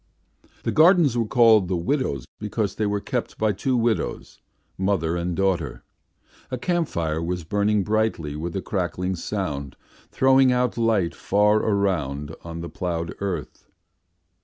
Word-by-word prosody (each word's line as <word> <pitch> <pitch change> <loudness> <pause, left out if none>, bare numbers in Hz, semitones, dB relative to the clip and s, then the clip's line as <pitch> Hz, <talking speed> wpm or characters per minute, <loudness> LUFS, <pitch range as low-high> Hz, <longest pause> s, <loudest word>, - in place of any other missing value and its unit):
The - - 0
gardens 160 -5 +5
were 115 -2 0
called 110 -5 +5
the 90 - -1
widows' 85 - -1
because 105 -1 -2
they 105 +1 -1
were 100 0 0
kept - - -4
by 110 -1 +2
two 125 +6 0
widows, 115 -2 -1 0.4
mother 95 -4 0
and 85 0 -2
daughter. 95 -3 -1 0.7
A 130 - -3
camp 175 +4 0
fire 80 -1 -2
was 90 +1 -3
burning 105 +4 +1
brightly 105 -8 -1
with 85 +4 -5
a 95 - -2
crackling 90 -1 -2
sound, 75 -7 -4 0.3
throwing 130 0 +4
out 125 -1 +1
light 110 -7 +1
far 105 +1 +2
around 80 -9 -1
on 85 0 -6
the 85 - -5
ploughed 85 -2 -3
earth. 95 -6 -5
100 Hz, 145 wpm, -24 LUFS, 85-110 Hz, 0.7 s, gardens